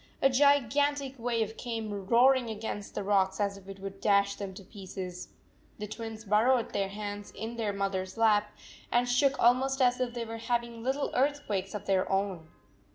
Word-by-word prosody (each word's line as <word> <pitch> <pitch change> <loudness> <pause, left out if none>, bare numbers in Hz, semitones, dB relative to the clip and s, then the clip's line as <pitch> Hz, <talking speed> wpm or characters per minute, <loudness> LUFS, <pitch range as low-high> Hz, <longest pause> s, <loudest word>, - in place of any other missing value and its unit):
A 270 - +4
gigantic 280 +1 +3
wave 225 -2 -1
came 215 -5 -4
roaring 245 +2 +5
against 210 -2 -5
the - - -2
rocks 195 -1 +2
as 200 -1 0
if 195 -1 -13
it 195 0 -8
would 195 0 -8
dash 200 -1 +3
them 200 -1 -6
to 195 - -10
pieces. 185 -2 -7 0.5
The 210 - -5
Twins 225 +1 -7
burrowed 225 +4 +3
their 195 -1 0
heads 205 0 -6
in 225 +3 -6
their 220 -3 -1
mother 195 -1 -1
s 185 +4 -9
lap, 210 -2 +3 0.4
and 245 +1 +3
shook 265 +3 +3
almost 260 +3 +3
as 250 -1 +3
if 245 -1 -2
they 235 -1 -3
were 225 0 -6
having 235 0 -2
little 265 +4 -1
earthquakes 250 -9 0
of 210 - -5
their 190 -1 +1
own. 195 -4 -1
220 Hz, 180 wpm, -30 LUFS, 200-245 Hz, 0.5 s, roaring